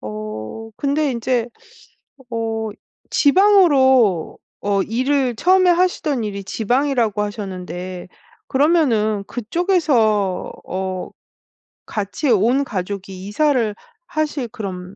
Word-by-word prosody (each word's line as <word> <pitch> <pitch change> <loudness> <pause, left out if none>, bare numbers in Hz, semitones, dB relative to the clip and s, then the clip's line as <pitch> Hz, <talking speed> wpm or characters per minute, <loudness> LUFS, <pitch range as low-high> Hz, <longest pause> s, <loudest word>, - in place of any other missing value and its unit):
어 110 - -7
근데 285 +1 0
인제 240 0 -1 0.8
어 225 -1 -2 0.4
지방으로 280 - +4 0.2
어 200 -1 +1
일을 255 +2 0
처음에 370 +4 +4
하시던 340 -8 +1
일이 200 -2 -5
지방이라고 230 0 0
하셨는데 185 -3 -6 0.4
그러면은 250 -9 +2
그쪽에서 240 - +1
어 185 0 -4 0.8
같이 210 +7 -3
온 240 +6 +3
가족이 190 -2 -5
이사를 240 -3 +1 0.3
하실 300 -5 -2
그런 185 -3 -7
225 Hz, 210 characters per minute, -20 LUFS, 200-280 Hz, 0.8 s, 지방으로